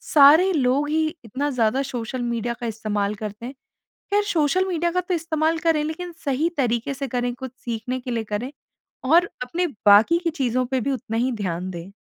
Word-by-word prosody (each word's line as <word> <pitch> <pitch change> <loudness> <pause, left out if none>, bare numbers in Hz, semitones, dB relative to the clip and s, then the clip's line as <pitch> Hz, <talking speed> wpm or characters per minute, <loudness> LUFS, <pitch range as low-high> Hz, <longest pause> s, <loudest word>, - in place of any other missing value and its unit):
सारे 310 +6 +6
लोग 280 -1 +1
ही 315 +1 +1 0.2
इतना 275 +7 -2
ज़्यादा 250 0 +1
सोशल 250 -2 -4
मीडिया 235 0 -2
का 240 - -3
इस्तेमाल 210 -2 -2
करते 210 +2 -7
हैं। 260 - -7 0.6
ख़ैर 410 0 +3
सोशल 365 -1 +1
मीडिया 345 -1 0
का 365 +1 +1
तो 360 +1 -3
इस्तेमाल 320 -1 0
करें 320 -2 +2
लेकिन 345 +3 -5
सही 285 +4 +1
तरीके 245 0 0
से 275 +1 -4
करें, 245 0 -1
कुछ 260 0 -7
सीखने 240 +2 -3
के 245 0 -6
लिए 230 -1 -1
करें 215 +5 -4 0.6
और 345 +1 +5
अपने 345 +8 -1 0.2
बाकी 210 +11 +7
की 335 - +1
चीज़ों 255 -5 0
पे 260 0 -1
भी 275 - -1
उतना 225 -3 -3
ही 255 +2 +1
ध्यान 185 -5 -3
दें। 175 +2 -8
260 Hz, 195 wpm, -23 LUFS, 230-315 Hz, 0.6 s, बाकी